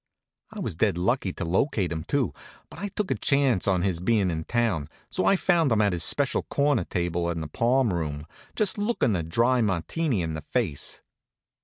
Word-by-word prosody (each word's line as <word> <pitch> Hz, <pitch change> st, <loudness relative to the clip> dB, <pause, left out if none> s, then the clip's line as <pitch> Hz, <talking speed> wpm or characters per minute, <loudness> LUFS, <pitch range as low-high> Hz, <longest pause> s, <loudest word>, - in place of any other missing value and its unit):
I -, -, -8 dB
was -, -, -3 dB
dead -, -, +2 dB
lucky 95 Hz, +2 st, 0 dB
to -, -, -4 dB
locate 95 Hz, -, 0 dB
him, 80 Hz, -1 st, -3 dB
too; 135 Hz, -, 0 dB, 0.4 s
but -, -, -10 dB
I 205 Hz, -, -3 dB
took 200 Hz, 0 st, -3 dB
a -, -, +2 dB
chance 135 Hz, -9 st, +1 dB
on 95 Hz, -2 st, +2 dB
his 95 Hz, -4 st, 0 dB
bein' 95 Hz, -1 st, +2 dB
in 80 Hz, -1 st, -4 dB
town, 110 Hz, -11 st, 0 dB, 0.2 s
so -, -, 0 dB
I 195 Hz, -, +5 dB
found 170 Hz, -7 st, +2 dB
him 110 Hz, -, +3 dB
at 105 Hz, -3 st, +3 dB
his 85 Hz, -1 st, 0 dB
special 140 Hz, -, +2 dB
corner 140 Hz, -4 st, +1 dB
table 85 Hz, -1 st, -1 dB
in 85 Hz, -1 st, -2 dB
the 80 Hz, -, -4 dB
palm 120 Hz, -, +2 dB
room, 75 Hz, -3 st, -3 dB, 0.3 s
just 215 Hz, 0 st, 0 dB
lookin' 205 Hz, -, +1 dB
a 85 Hz, -, 0 dB
dry 115 Hz, +10 st, +2 dB
Martini 105 Hz, -, 0 dB
in 80 Hz, -1 st, -3 dB
the 80 Hz, -, -4 dB
face. 80 Hz, -, -3 dB
105 Hz, 200 wpm, -26 LUFS, 85-135 Hz, 0.4 s, I